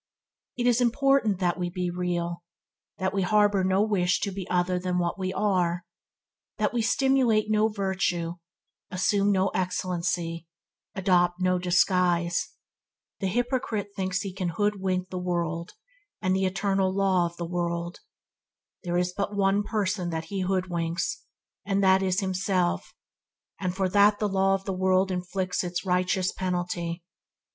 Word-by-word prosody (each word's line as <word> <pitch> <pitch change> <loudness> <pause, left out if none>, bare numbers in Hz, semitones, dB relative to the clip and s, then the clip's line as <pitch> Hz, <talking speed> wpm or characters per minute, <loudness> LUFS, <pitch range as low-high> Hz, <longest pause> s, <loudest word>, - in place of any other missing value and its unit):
It 245 - -1
is 245 0 +3
all 245 - +5
important 270 -5 +2
that 180 -1 0
we 175 -1 -1
be 180 0 -2
real; 175 -1 -2 0.6
that 190 0 -1
we 195 - +1
harbour 205 0 +3
no 190 +2 +3
wish 185 -4 +1
to 200 - -1
appear 190 -1 -6
other 180 0 +1
than 180 0 -1
what 175 +2 -1
we 185 0 -1
are; 180 -4 0 0.7
that - - 0
we 240 - +1
simulate 230 -3 +2
no 215 0 +4
virtue, 190 -5 -1 0.6
assume 200 +2 +2
no 190 0 +2
excellency, 175 -2 -2 0.5
adopt 180 -2 +2
no 185 0 +2
disguise. 175 -1 +2 0.6
The 195 - -1
hypocrite 240 -1 -1
thinks 190 0 -1
he 195 -2 -5
can 185 -2 -2
hood 205 +2 -1
wink 185 -1 -1
the 185 - -3
world 170 -2 -2 0.5
and 185 -2 +1
the 190 0 +1
eternal 195 0 0
law 190 -2 +2
of 170 0 -11
the 170 - -3
world. 170 0 -3 0.8
There 175 -1 -1
is 180 0 0
but 200 +1 -2
one 195 0 +2
person 205 -4 -1
that 160 -1 -3
he 195 - -1
hoodwinks, 180 -2 -2 0.4
and 200 0 0
that 190 0 +5
is 190 +1 +1
himself, 185 -1 0 0.7
and 180 -1 -2
for 190 -1 +1
that 205 +2 +5
the 210 - 0
law 195 0 +2
of 195 0 -6
the 195 - -2
world 185 +1 +2
inflicts 185 +1 -2
its 175 +1 -3
righteous 185 0 +1
penalty. 175 -2 -3
185 Hz, 155 wpm, -27 LUFS, 180-200 Hz, 0.8 s, all